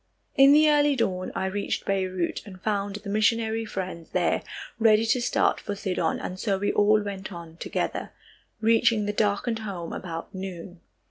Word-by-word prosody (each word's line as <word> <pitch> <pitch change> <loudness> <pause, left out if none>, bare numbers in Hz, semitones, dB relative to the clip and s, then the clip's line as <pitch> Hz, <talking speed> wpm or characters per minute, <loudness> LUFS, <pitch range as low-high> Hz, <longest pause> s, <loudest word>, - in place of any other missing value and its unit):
In 275 +1 +7
the 305 +1 +6
early 295 -1 +4
dawn, 185 -7 -1
I - - -1
reached 200 +1 -2
Beirut 185 -3 -1
and 190 -3 -11
found 205 0 -2
the 210 0 -7
missionary 225 +1 +1
friends 185 -5 -5
there 175 -2 +1 0.4
ready 220 -1 +5
to 240 +2 +2
start - - +1
for 205 - -5
Sidon, 185 -5 -1
and 185 +1 -6
so 200 -2 0
we 205 +1 0
all 210 +1 +4
went 195 -1 -6
on 170 -2 -9
together, - - -3 0.5
reaching 225 -1 +3
the 205 - -1
darkened 215 +2 0
home 190 -6 -5
about 165 -2 -6
noon. 185 -2 -7
200 Hz, 165 wpm, -26 LUFS, 185-220 Hz, 0.5 s, In